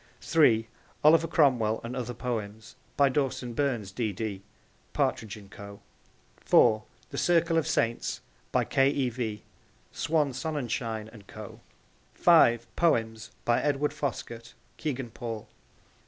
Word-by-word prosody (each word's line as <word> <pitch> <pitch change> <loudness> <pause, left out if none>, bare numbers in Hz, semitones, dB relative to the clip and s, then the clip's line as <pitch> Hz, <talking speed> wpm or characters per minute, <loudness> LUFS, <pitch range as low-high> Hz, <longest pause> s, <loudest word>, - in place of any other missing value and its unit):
(3) 115 -9 +3 0.4
Oliver 160 +2 +6
Cromwell 125 -9 +3
and 120 +2 -5
Other 125 -2 -4
Poems. 110 -3 -5 0.2
By 140 - +5
Dawson 130 -3 -1
Burns, 120 -7 -1
D.D. 105 -2 -3 0.5
(Partridge 110 -1 -1
and 100 -2 -14
Co.) 100 0 -10 0.6
(4) 110 0 +4 0.3
The - - -3
Circle 170 -1 +3
of 160 -1 +2
Saints. 115 -7 0 0.3
By - - +2
K. 135 0 +3
E. 140 -3 0
V. 110 -3 -4 0.5
(Swan 150 -3 0
Sonnenschein 120 -7 -3
and 100 -4 -14
Co.) - - -10 0.6
(5) 120 -9 +4
Poems. 115 -9 +1 0.2
By 120 - +2
Edward 145 0 0
Foskett. 120 -6 -5 0.2
(Kegan 135 -6 -4
Paul.) 115 -2 -6
120 Hz, 125 wpm, -28 LUFS, 110-145 Hz, 0.6 s, Oliver